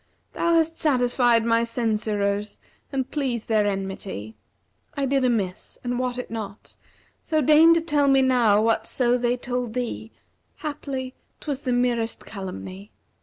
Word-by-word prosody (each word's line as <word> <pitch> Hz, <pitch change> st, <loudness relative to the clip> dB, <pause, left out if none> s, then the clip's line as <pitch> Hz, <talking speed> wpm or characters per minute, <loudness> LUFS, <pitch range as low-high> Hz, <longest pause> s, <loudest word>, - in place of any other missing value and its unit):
* -, -, -43 dB
Thou 335 Hz, 0 st, +1 dB
hast 325 Hz, 0 st, +1 dB
satisfied 245 Hz, -4 st, +3 dB
my 230 Hz, 0 st, +3 dB
censurers 210 Hz, -3 st, -1 dB, 0.3 s
and 265 Hz, -2 st, -2 dB
pleased 260 Hz, -6 st, -2 dB
their 215 Hz, -2 st, +2 dB
enmity: 190 Hz, -, -4 dB, 0.6 s
I 280 Hz, -, +1 dB
did 270 Hz, 0 st, +1 dB
amiss 210 Hz, -7 st, -1 dB
and 245 Hz, 0 st, -2 dB
wot 250 Hz, -1 st, -2 dB
it 250 Hz, -, -6 dB
not; 215 Hz, -2 st, -7 dB, 0.5 s
so 310 Hz, -, 0 dB
deign 310 Hz, +3 st, +6 dB
to 335 Hz, -, +2 dB
tell 295 Hz, -3 st, +1 dB
me 270 Hz, -1 st, +5 dB
now 240 Hz, -5 st, +4 dB
* -, -, +1 dB
Whatso 230 Hz, +2 st, +1 dB
they 245 Hz, 0 st, 0 dB
told 245 Hz, -2 st, -3 dB
thee, 235 Hz, -2 st, -4 dB, 0.5 s
haply 275 Hz, -4 st, -4 dB, 0.3 s
'twas 285 Hz, -3 st, -4 dB
the 255 Hz, -, -2 dB
merest 240 Hz, -2 st, 0 dB
calumny. 190 Hz, 0 st, -8 dB
245 Hz, 150 wpm, -24 LUFS, 220-265 Hz, 0.6 s, deign